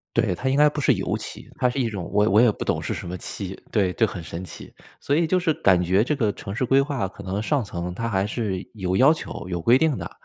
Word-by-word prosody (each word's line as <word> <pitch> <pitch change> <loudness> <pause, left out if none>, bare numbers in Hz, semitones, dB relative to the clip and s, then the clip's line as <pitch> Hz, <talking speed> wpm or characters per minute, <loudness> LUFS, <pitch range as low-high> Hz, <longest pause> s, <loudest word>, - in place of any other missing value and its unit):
对， 115 -6 +2
它 130 +9 -2
应 135 - +1
该 150 0 +6
不 145 0 -4
是 - - +4
油 - - -2
漆， - - -9
它 125 - +2
是 135 - -3
一 120 - +1
种， 95 -5 -5
我 105 +1 +3
我 105 +4 +5
也 120 -3 +5
不 - - -6
懂 - - 0
是 - - -3
什 - - -6
么 90 - -4
漆， 95 0 -6
对， 95 -5 +1
就 115 - +2
很 90 - -6
神 85 +2 -6
奇。 - - -11 0.3
所 140 - 0
以 165 0 +2
就 185 +2 +2
是 165 -3 +1
感 90 -8 +3
觉 95 +4 +3
这 150 +4 0
个 110 -7 +1
城 95 - -7
市 130 - 0
规 135 +2 +4
划 135 -8 -2
可 - - -12
能 95 +2 -2
上 140 +1 0
层 90 -2 -5
它 115 +4 -3
还 95 -2 +1
是 105 -4 -3
有 95 -3 -1
要 140 +5 +6
求、 155 - -7
有 85 -2 -2
规 120 +6 +5
定 155 -3 +1
的， - - -5
110 Hz, 305 characters per minute, -24 LUFS, 95-135 Hz, 0.3 s, 该